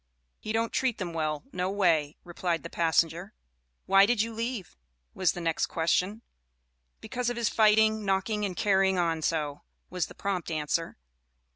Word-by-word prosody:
"He 215 - -5
don't 225 +1 0
treat 260 -4 0
them 175 -3 -4
well 155 -2 -2
no 180 +1 -1
way," 165 -7 +1
replied 175 -1 -2
the 170 - -8
passenger. 170 +3 0 0.5
"Why 195 +1 +6
did 240 -1 +1
you 230 +2 0
leave?" 230 -3 -4 0.4
was 185 -4 +1
the 175 - -6
next 165 -1 0
question. 180 +6 0 0.8
"Because 245 -1 -2
of 245 - -4
his 235 -2 +1
fighting, 220 0 +4
knocking 200 +2 0
and 190 -3 -2
carrying 190 -2 +3
on 165 -2 0
so," 150 -3 -1 0.3
was 180 -1 -1
the - - -13
prompt 190 -4 -3
answer. 160 +1 -2
185 Hz, 160 wpm, -28 LUFS, 165-215 Hz, 0.8 s, Why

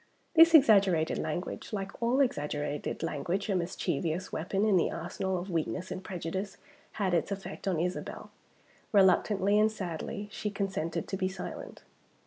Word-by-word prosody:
This 330 0 +8
exaggerated 200 - +5
language 160 +8 -4
like 195 -2 -3
all 245 +4 +3
exaggerated 150 - -2
language, 175 +7 -2
a 195 - +2
mischievous 175 -1 -2
weapon 195 +5 0
in 210 -3 +4
the 175 - +3
arsenal 190 +2 -3
of 180 +2 -5
weakness 170 +2 -2
and 190 - -5
prejudice 190 +2 -4 0.4
had 190 -3 -1
its 170 +3 +1
effect 195 0 -6
on 180 -4 +1
Isabel. 180 +2 -4 0.6
Reluctantly 200 +1 +4
and 215 +1 +4
sadly, 200 +1 -5
she 210 - -3
consented 190 -5 -3
to 195 - -3
be 185 -1 0
silent. 185 -1 -7
190 Hz, 145 wpm, -30 LUFS, 170-205 Hz, 0.6 s, This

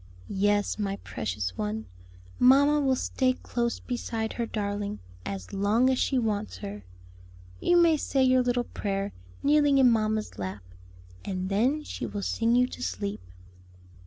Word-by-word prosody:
"Yes, 205 +2 +1
my 200 -1 -1
precious 95 -3 -3
one, 105 +1 -2 0.5
mamma 280 +4 +6
will 265 -2 +2
stay 255 0 +1
close 235 -1 -2
beside 225 -3 -3
her 235 -1 -2
darling 205 - -3 0.3
as 95 -2 -6
long 210 +6 +3
as 260 - 0
she 270 - +1
wants 205 - -1
her. 100 +1 -7 0.8
You 350 - +3
may 335 -2 +5
say 270 -2 +1
your 255 0 +5
little 245 0 +1
prayer 200 -3 -3 0.3
kneeling 290 -1 +4
in 260 -3 +6
mamma's 215 - -1
lap; 95 0 -5 0.6
and 185 -1 -3
then 255 +10 +1
she - - -5
will 205 -1 -5
sing 230 +3 +1
you 250 0 +5
to - - -9
sleep." 95 +3 -3
215 Hz, 150 wpm, -27 LUFS, 190-255 Hz, 0.8 s, mamma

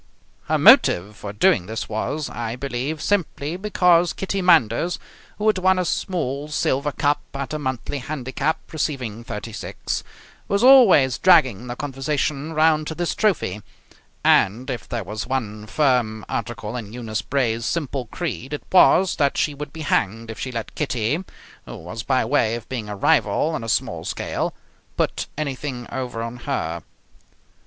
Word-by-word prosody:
Her - - +1
motive 100 +5 +6
for 100 -1 -7
doing 100 -3 +2
this 110 +1 -4
was, 135 +7 -2
I 115 -1 -4
believe, 140 +4 -3
simply 170 -5 -1
because 180 -3 +3
Kitty 195 0 -2
Manders, 170 -2 +3 0.4
who 210 - -3
had 215 -3 +3
won 185 0 +3
a 180 - 0
small 150 -5 -2
silver 145 -1 0
cup 145 +1 +1
at 140 +2 -4
a 155 - -2
monthly 130 0 -3
handicap, 140 +2 -2 0.2
receiving 125 -8 -3
thirty 115 -1 -6
six, 105 - -4 0.4
was 200 +3 +1
always 210 - +7
dragging 130 - +4
the 120 - -4
conversation 145 +2 -2
round 155 -1 +3
to 160 - -4
this 175 0 -1
trophy, 155 - 0 0.6
and 120 +8 +3
if 125 - -6
there 115 -3 -2
was 105 +4 -5
one 110 -5 -3
firm 120 -5 +1
article 115 -1 -4
in 110 -3 -6
Eunice 110 -4 -3
Bray's 115 -3 0
simple 140 -6 -2
creed 150 -2 -5
it 145 - -4
was 185 0 +5
that 140 -2 +1
she 150 - +1
would 145 0 -7
be 160 - -8
hanged 115 -5 0
if 110 - -9
she 130 - -4
let 115 -2 -5
Kitty, 135 - -1 0.4
who - - -7
was 90 +7 -7
by 130 0 +1
way 115 -3 +2
of 120 - -8
being 115 -5 -5
a 105 - -4
rival 100 +7 +2
on 155 -8 -3
a 115 - -5
small - - -1
scale, - - -3 0.4
put - - -1
anything 135 -4 -4
over 125 -3 -4
on 115 +1 -6
her. 85 - -3
130 Hz, 165 wpm, -22 LUFS, 115-155 Hz, 0.6 s, always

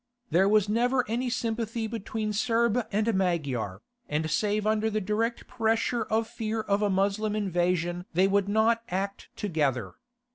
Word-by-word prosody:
There 190 +4 +4
was 210 -1 +4
never 245 +4 +2
any 245 +3 -1
sympathy 230 -1 -2
between 220 -1 -3
Serb 230 +1 +1
and 215 +2 +1
Magyar, 140 - -1 0.3
and 155 +1 -1
save 210 +3 +1
under 215 0 +2
the 215 0 0
direct 215 +4 -1
pressure 225 0 0
of 220 +1 0
fear 220 -1 -3
of 200 -1 0
a 205 - +2
Moslem 200 +2 +1
invasion 175 -3 0
they 185 +3 +3
would 200 0 +1
not 220 +2 +3
act 195 +2 -3
together. 135 - -1
210 Hz, 150 wpm, -28 LUFS, 185-225 Hz, 0.3 s, There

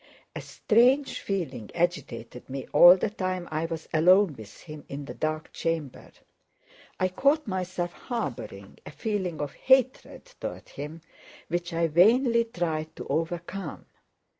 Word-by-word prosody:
A - - -4
strange 255 +5 +2
feeling 150 - -4
agitated 170 -9 -3
me 135 0 -5
all 175 +5 +9
the 205 +2 -1
time 185 -3 -3
I 155 +1 -1
was 165 -1 -5
alone 180 +2 +5
with 110 -4 -12
him 155 -2 -10
in 140 +1 -6
the - - -7
dark 155 0 -3
chamber. 160 -5 -3 0.9
I 185 - +3
caught 280 +11 +2
myself 185 -3 -3
harboring 120 - -6
a - - -9
feeling 190 -7 -3
of 145 -1 -4
hatred 260 - +1
toward - - -6
him 150 +4 -8 0.5
which 175 +1 -2
I 165 0 +1
vainly 230 - +4
tried 160 -7 -3
to - - -7
overcome. 165 +3 -3
175 Hz, 140 wpm, -27 LUFS, 155-195 Hz, 0.9 s, all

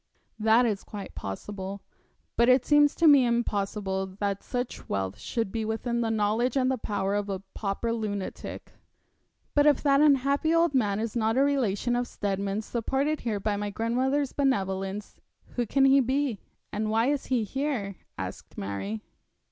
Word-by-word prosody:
That 225 +3 +5
is 210 -4 -1
quite 205 -2 -8
possible; 195 - -6 0.5
but 235 +1 +4
it 255 0 +5
seems 295 0 +5
to 335 - +2
me 285 -3 +8
impossible 205 -5 -1
that 200 -1 -1
such 245 -1 -4
wealth 95 +1 -2
should 225 - -2
be 225 -1 -2
within 235 +2 -1
the 230 - 0
knowledge 225 +4 +1
and 260 0 +2
the 260 - 0
power 200 -2 -1
of 205 0 -1
a 195 -1 -3
pauper 215 +3 -2
lunatic.' 205 -4 -5 0.8
'But 290 0 +4
if 290 -3 +4
that 280 -1 +4
unhappy 285 +2 +3
old 335 -2 +3
man 210 -6 +1
is 225 0 -3
not 225 0 +1
a 270 - +5
relation 245 -4 +1
of 245 0 0
Steadman's 200 0 -2
supported 270 +6 -1
here 215 -4 -2
by 205 +1 0
my 205 0 -2
grandmother's 255 +6 0
benevolence, 195 -7 -1 0.3
who 240 -2 -2
can 270 +5 +3
he 270 +1 +6
be, 265 -3 0 0.3
and 215 +1 -1
why 225 +2 +2
is 285 +1 0
he 250 -4 +1
here?' 235 -5 -2 0.2
asked - - -7
Mary. 100 +2 -4
225 Hz, 165 wpm, -27 LUFS, 200-265 Hz, 0.8 s, me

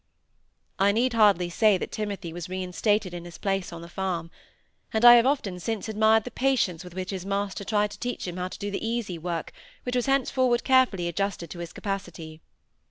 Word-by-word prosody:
I 200 +1 +5
need 240 +3 +1
hardly 205 -6 +4
say 210 +2 +4
Timothy 200 -3 -4
was 175 0 -6
reinstated 185 +2 0
in 175 -1 -6
his 175 -1 -10
place 195 -3 -2
on 170 0 -8
the - - -9
farm; 170 -2 -3 0.6
and 220 +2 +2
I 240 - +12
have 240 +1 +6
often 205 -10 -1
since 220 +4 -3
admired 220 0 +3
the 250 - -7
patience 225 -10 0
with 180 -1 -11
which 185 +1 -4
his 190 -2 -4
master 200 0 -2
tried 210 0 +1
to - - -10
teach 245 -5 -4
him 175 0 -5
how 180 0 -2
to - - -9
do 205 0 -4
the 195 - -4
easy 225 -6 -2
work 170 0 -4 0.3
which 250 0 -3
was 245 0 0
henceforward 260 -2 +2
carefully 255 -10 +3
adjusted 175 -1 -3
to 175 - -7
his 170 -1 -6
capacity. 175 -5 -6
195 Hz, 200 wpm, -26 LUFS, 175-225 Hz, 0.6 s, I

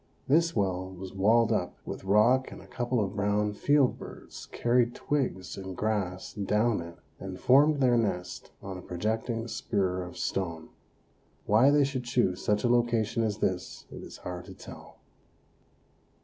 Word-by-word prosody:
This 165 +4 +3
well 95 -2 -1
was 95 0 -9
walled 110 +4 +3
up 90 -5 -1
with - - -6
rock 115 +7 +4
and - - -9
a - - -13
couple 120 0 -2
of 100 -1 -2
brown 105 +1 +1
field 140 +4 +2
birds - - -10
carried 120 0 +2
twigs 125 -11 -2
and 95 -1 -7
grass 100 -4 -2
down 105 +1 +1
it 85 0 -9 0.2
and 95 -1 -7
formed 145 +3 +5
their 125 -2 +4
nest 90 -5 -3
on 95 -1 -6
a - - -9
projecting 110 +6 -2
spur 95 -6 -1
of 90 0 -8
stone. 85 -4 -3 0.8
Why 115 +6 +5
they 145 0 +5
should 135 -2 -2
choose 120 -7 0
such 105 0 +1
a - - +3
location 120 -1 +2
as 105 -2 -1
this 95 -4 -3
it - - -8
is - - -10
hard 90 -1 -7
to 95 -1 -11
tell. - - -12
105 Hz, 165 wpm, -29 LUFS, 95-120 Hz, 0.8 s, formed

